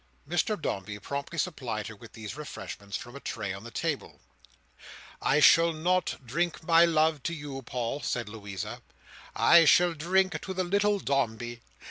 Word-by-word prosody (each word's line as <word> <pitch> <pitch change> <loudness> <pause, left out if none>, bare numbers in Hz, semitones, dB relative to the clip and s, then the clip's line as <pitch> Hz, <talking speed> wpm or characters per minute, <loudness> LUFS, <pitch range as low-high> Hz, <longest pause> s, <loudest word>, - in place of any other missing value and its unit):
Mr 175 +6 0
Dombey 105 -6 -3
promptly 140 - -5
supplied 125 - -2
her 110 - -7
with 115 +2 -14
these 110 +1 -7
refreshments 100 -9 -6
from 120 +2 -10
a - - -7
tray 95 -7 -4
on 100 +2 -8
the 120 - -8
table. - - -3 1.0
"I 145 - +3
shall 165 +3 +6
not 175 -3 0
drink 170 +8 -1
my 165 +1 +6
love 160 -2 +2
to 170 - -3
you, 145 -3 -6
Paul," 125 +2 -3
said 120 -3 -2
Louisa: 100 -3 -6 0.5
"I 170 -1 +7
shall 175 +3 +5
drink 185 +5 +1
to 190 - -5
the 185 - 0
little 205 +3 +2
Dombey. 120 - -2
145 Hz, 160 wpm, -28 LUFS, 115-170 Hz, 1.0 s, I